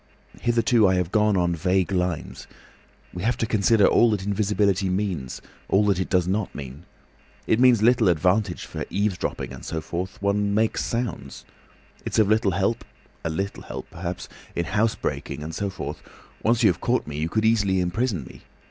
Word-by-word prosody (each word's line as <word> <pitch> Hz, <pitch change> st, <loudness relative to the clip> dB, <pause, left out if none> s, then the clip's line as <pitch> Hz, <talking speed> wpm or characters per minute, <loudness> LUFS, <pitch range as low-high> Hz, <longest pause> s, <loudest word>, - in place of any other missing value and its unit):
"Hitherto 115 Hz, -2 st, +3 dB
I 95 Hz, -, +3 dB
have 90 Hz, -1 st, -1 dB
gone 105 Hz, -2 st, +3 dB
on 85 Hz, -1 st, +1 dB
vague 90 Hz, +3 st, +1 dB
lines. 90 Hz, -3 st, -2 dB, 0.7 s
We 90 Hz, -, -6 dB
have 120 Hz, +5 st, 0 dB
to -, -, 0 dB
consider 110 Hz, -1 st, +3 dB
all 120 Hz, -, +5 dB
that 100 Hz, -3 st, -1 dB
invisibility 100 Hz, -1 st, +1 dB
means, 90 Hz, -9 st, -3 dB, 0.3 s
all 100 Hz, +2 st, +3 dB
that 100 Hz, -3 st, +2 dB
it 95 Hz, -, -2 dB
does 90 Hz, -2 st, +2 dB
not 100 Hz, +1 st, -1 dB
mean. 70 Hz, +3 st, -8 dB, 0.6 s
It 110 Hz, -, +2 dB
means 125 Hz, -4 st, +5 dB
little 120 Hz, -3 st, +4 dB
advantage 90 Hz, +3 st, +1 dB
for -, -, -5 dB
eavesdropping 100 Hz, -1 st, -2 dB
and -, -, -10 dB
so 80 Hz, -, -3 dB
forth—one 100 Hz, +4 st, -2 dB
makes 110 Hz, +1 st, +1 dB
sounds. 115 Hz, -, -4 dB, 0.6 s
It's -, -, -3 dB
of 110 Hz, -2 st, +4 dB
little 110 Hz, -3 st, +2 dB
help—a 95 Hz, -3 st, -3 dB
little 95 Hz, +5 st, -3 dB
help -, -, -8 dB
perhaps—in 85 Hz, 0 st, -6 dB
housebreaking 100 Hz, -7 st, -1 dB
and 80 Hz, +2 st, -6 dB
so 100 Hz, +3 st, -2 dB
forth. 75 Hz, -6 st, -6 dB, 0.4 s
Once 120 Hz, +2 st, +2 dB
you've 90 Hz, -6 st, +3 dB
caught 125 Hz, +1 st, +1 dB
me 75 Hz, 0 st, -6 dB
you 80 Hz, +2 st, -1 dB
could 110 Hz, +4 st, 0 dB
easily 100 Hz, -4 st, +3 dB
imprison 90 Hz, -, -1 dB
me. -, -, -13 dB
100 Hz, 165 wpm, -24 LUFS, 90-110 Hz, 0.7 s, all